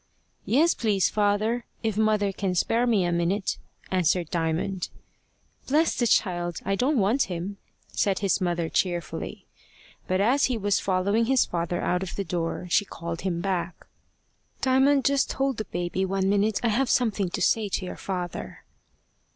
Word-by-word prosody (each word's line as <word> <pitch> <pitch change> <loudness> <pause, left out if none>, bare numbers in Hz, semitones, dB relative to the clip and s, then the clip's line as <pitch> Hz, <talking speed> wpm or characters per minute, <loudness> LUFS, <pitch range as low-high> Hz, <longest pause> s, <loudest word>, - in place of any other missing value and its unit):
"Yes, 315 +8 +4
please, 205 -5 +1
father 215 +3 +1 0.2
if 220 -2 0
mother 215 -2 +2
can 190 -1 -2
spare 230 +7 +2
me 210 -6 +3
a 175 - 0
minute," 175 +4 0 0.3
answered 180 -2 +1
Diamond. 170 +2 -1 0.8
"Bless 310 +4 +2
the 240 - +1
child! 175 -5 +1
I 195 - 0
don't 260 +8 +1
want 225 +6 +2
him," 180 +3 -4 0.3
said 195 -2 0
his 195 -2 +1
mother 175 -2 0
cheerfully. 175 -1 -2 0.6
But 185 0 +1
as 250 +8 +3
he 250 -3 0
was 205 -2 +1
following 200 +4 +1
his 260 +1 +3
father 170 0 -2
out 180 0 +1
of 190 - -5
the 200 - -2
door, 170 +1 -3
she 180 - +3
called 170 -3 -6
him 175 -3 -2
back. 185 -2 -3 0.8
"Diamond, 265 +1 +3
just 280 -1 +2
hold 270 -2 0
the 215 - -3
baby 175 +1 -2
one 190 0 0
minute. 205 +2 +2
I 235 - +3
have 250 +4 +1
something 210 -6 +1
to - - -4
say 215 -2 +2
to 185 - -2
your - - -6
father." 180 -3 -5
195 Hz, 165 wpm, -26 LUFS, 180-225 Hz, 0.8 s, Yes